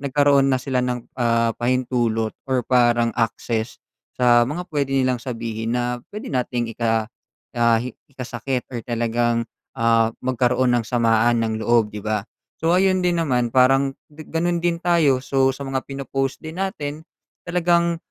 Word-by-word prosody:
nagkaroon 140 0 +3
na 130 - +2
sila 130 0 -1
ng, 125 -1 -3
ah, 115 -1 +2
pahintulot 120 -3 0 0.2
or 130 -2 +1
parang 120 -2 +3
access, 115 0 -2 0.4
sa 120 -1 +5
mga 170 +8 -4
pwede 140 -2 -1
nilang 130 -3 +1
sabihin 115 -2 -3
na 125 0 -2
pwede 210 - -6
nating 120 -3 -2
ika 115 -2 0 0.5
ah, 115 -1 +4
hi 125 +1 -4 0.2
ikasakit 125 0 -4
or 120 - -4
talagang, 120 0 0 0.3
ah, 115 -1 +2
magkaroon 125 0 +1
ng 115 - -3
samaan 115 -1 +2
ng 110 -1 -1
loob, 115 -3 +3
'di 105 -1 -7
ba? 105 -1 -1 0.4
So, 165 +2 +2
ayun 185 0 +3
din 180 -1 +1
naman 125 -7 +1
parang 135 +2 +3 0.2
di 155 - -13
gano'n 170 +1 0
din 170 -1 +1
tayo, 150 -7 +3
so 135 -1 +2
sa 135 +1 -3
mga 135 -1 -2
pino-post 135 0 -3
din 160 +4 -6
natin 155 -6 -4 0.4
talagang, 170 -1 +1
125 Hz, 155 wpm, -22 LUFS, 115-140 Hz, 0.5 s, sa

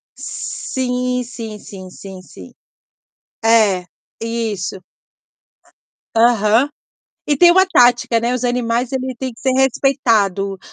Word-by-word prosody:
Sim, 250 -1 -3
sim, 225 -3 -8
sim, 185 -2 -11
sim, 190 0 -11
sim. 95 - -14 0.9
É, 215 -5 +3 0.4
isso. 220 -5 -3 1.4
Aham. 225 +2 +3 0.6
E 290 - +1
tem 345 +5 +7
uma 375 +2 +5
tática, 245 -7 +3
né. 240 +2 -1
Os 250 - -3
animais 245 0 0
eles 260 0 -3
têm 260 -2 -4
que 230 - -18
ser 265 - +1
respeitado, 230 -8 +1
235 Hz, 110 wpm, -18 LUFS, 210-255 Hz, 1.4 s, tem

